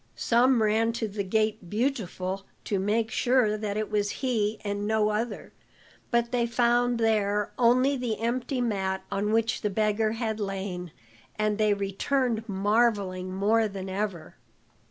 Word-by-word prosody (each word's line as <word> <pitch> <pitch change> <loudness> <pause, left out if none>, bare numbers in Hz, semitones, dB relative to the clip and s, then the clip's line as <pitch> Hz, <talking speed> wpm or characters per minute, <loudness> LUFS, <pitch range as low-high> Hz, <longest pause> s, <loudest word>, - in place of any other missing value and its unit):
Some 240 0 +3
ran 220 +2 +2
to 230 -1 -2
the 200 0 -3
gate 215 -1 -1
Beautiful 195 -5 -2 0.2
to 200 - -1
make 220 +3 0
sure 245 -4 +2
that 210 -1 -3
it 215 -1 -3
was 205 -1 +1 0.2
he 220 -4 0
and 205 0 -2
no 215 -1 +2
other, 215 +1 -3 0.6
but 235 -1 +1
they 240 -2 +1
found 240 +1 +2
there 210 -2 +1
only 255 +3 +4
the 235 -4 -2
empty 245 +3 -1
mat 190 -5 -1
on 205 +2 0
which 225 0 +1
the 210 - 0
beggar 215 +1 +1
had 225 -1 -2
lain, 190 -4 -4 0.4
and 215 0 0
they 210 -1 +3
returned 225 +4 -1
marvelling 200 -2 +1
more 215 +4 +2
than 195 -2 -6
ever. 195 -3 -4
215 Hz, 150 wpm, -27 LUFS, 200-235 Hz, 0.6 s, only